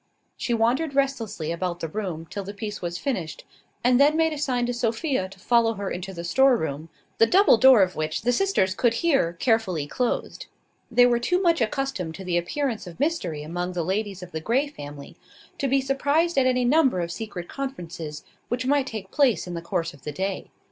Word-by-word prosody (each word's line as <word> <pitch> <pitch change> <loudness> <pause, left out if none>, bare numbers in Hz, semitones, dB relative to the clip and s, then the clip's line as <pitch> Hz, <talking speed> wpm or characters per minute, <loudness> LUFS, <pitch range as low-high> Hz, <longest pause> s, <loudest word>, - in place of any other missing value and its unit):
She 240 -2 -1
wandered 260 +6 +1
restlessly 230 - -1
about 175 0 -3
the 165 - -3
room 170 -3 -4
till 200 - -5
the 200 +2 -8
piece 210 0 -5
was 175 -1 -3
finished, 185 - -4 0.4
and 250 +1 +4
then 295 +2 +5
made 320 -1 +2
a - - -5
sign 250 -4 0
to 245 - -2
Sophia 235 - -1
to 195 - -14
follow 230 +3 +2
her 200 -1 -4
into 185 +2 -5
the 170 -2 -7
storeroom, 170 - +2 0.3
the 225 - +6
double 390 - +6
door 255 -3 +7
of 185 0 -2
which 155 0 -2
the 245 - +2
sisters 245 - +1
could 230 +3 +1
hear 270 - +3
carefully 185 - 0
closed. 245 - -2 0.4
They 245 0 +5
were 240 -1 +3
too 360 +10 +1
much 335 -6 +2
accustomed 230 - -2
to 190 - -8
the 180 -2 -1
appearance 230 +3 -3
of 175 - -11
mystery 200 - -1
among 175 +3 -4
the 175 -2 -1
ladies 195 0 -2
of 180 - -10
the 160 - -4
Grey 245 - +1
family, 145 - -10 0.4
to 275 - 0
be 270 +1 +2
surprised 285 +5 +1
at 265 -1 +4
any 250 -1 +2
number 265 - +3
of 170 0 -3
secret 185 -3 -6
conferences 175 - -6 0.2
which 245 +1 -2
might 280 0 +2
take 215 -6 -6
place 275 -7 +2
in 180 - -6
the 170 - -4
course 170 -1 -2
of 140 - -17
the 150 - -5
day. 190 +6 -3
225 Hz, 205 wpm, -25 LUFS, 175-270 Hz, 0.4 s, door